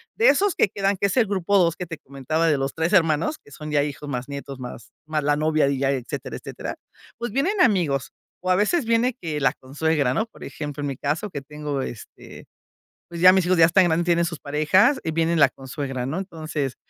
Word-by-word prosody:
De 450 +3 +3
esos 405 -1 +3
que - - +2
quedan, 195 +1 0
que 200 - +1
es 200 - -3
el 240 - +5
grupo 200 0 +1
2 170 -3 +3
que 180 -1 -6
te 165 - -6
comentaba 150 +4 -2
de 150 - +2
los 135 0 -2
3 165 +4 0
hermanos 165 - +2
que - - -18
son 150 +2 -8
ya 145 -1 +3
hijos, 145 0 -6
más 125 -1 -4
nietos, 140 -1 -7
más 125 -1 -9 0.2
más 155 -1 -1
la 145 +1 +2
novia, 155 -1 +2
y 140 -1 -1
ya 135 0 +1
etcétera, 130 -4 -4
etcétera. - - -7 0.4
Pues 235 -2 -4
vienen 360 - +1
amigos, 170 - +2 0.3
o 185 - +1
a - - +5
veces 225 - +1
viene 230 +2 +2
que 155 -6 -3
la 135 - +2
consuegra, 140 0 0
¿no? 220 - 0
Por - - -14
ejemplo, 145 -1 -6
en 145 - -2
mi 135 - -4
caso 155 +9 -2
que 140 - -5
tengo 150 -1 -4
este, 120 -4 -9 0.6
pues, 170 -1 -7
ya 185 +1 +9
mis 190 -1 +3
hijos 185 -1 +2
ya 165 - +8
están 180 +2 +4
grandes, 170 0 +1
tienen 170 -1 +3
sus 165 -2 -5
parejas 185 - +3
y 160 - -2
viene 165 +1 +1
la 140 -3 +6
consuegra, 135 -1 -5
¿no? 155 +7 -3
Entonces, 155 -7 -4
160 Hz, 230 wpm, -23 LUFS, 140-185 Hz, 0.6 s, ya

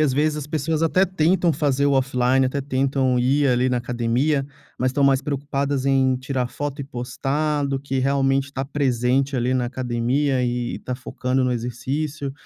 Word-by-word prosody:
às 150 -3 +3
vezes 150 +3 +1
as 145 - -5
pessoas 155 +1 -1
até 185 +4 +3
tentam 175 -1 +2
fazer 140 -2 +1
o 140 - +2
offline, 130 0 +2
até 140 +2 -2
tentam 130 -1 +1
ir 135 +3 +2
ali 125 +1 +2
na 125 -1 +1
academia, 125 +4 0 0.3
mas 130 +1 +1
estão 140 +2 0
mais 135 -1 +4
preocupadas 140 -1 -2
em 135 -1 +3
tirar 130 -1 -2
foto 145 +2 -5
e 140 - -4
postar 140 +3 -2
do 135 -1 -2
que 135 -1 -3
realmente 135 0 +2
está 135 -1 -5
presente 135 -1 0
ali 125 +1 0
na 130 -1 +1
academia 125 +2 0
e 120 0 -2
está 125 - -5
focando 130 0 -2
no 125 - +1
exercício. 135 +5 -3
135 Hz, 180 wpm, -22 LUFS, 125-145 Hz, 0.3 s, mais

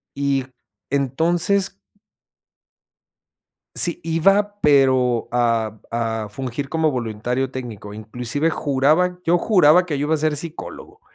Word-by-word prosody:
Y 140 -2 0 0.5
entonces 165 - 0 2.0
sí, 170 -1 +3
iba 195 +6 +2
pero, 130 -4 +3
a 115 -3 0
a 115 -2 -2
fungir 130 +4 -5
como 160 0 +1
voluntario 125 +2 -2
técnico. 110 -5 -7
Inclusive 125 +8 -2
juraba 155 +6 +1
yo 175 +1 +3
juraba 180 -3 +4
que 150 -4 -2
yo 145 - -1
iba 160 - +1
a - - +2
ser 155 -1 0
psicólogo. 170 - -8
140 Hz, 115 wpm, -21 LUFS, 120-165 Hz, 2.0 s, juraba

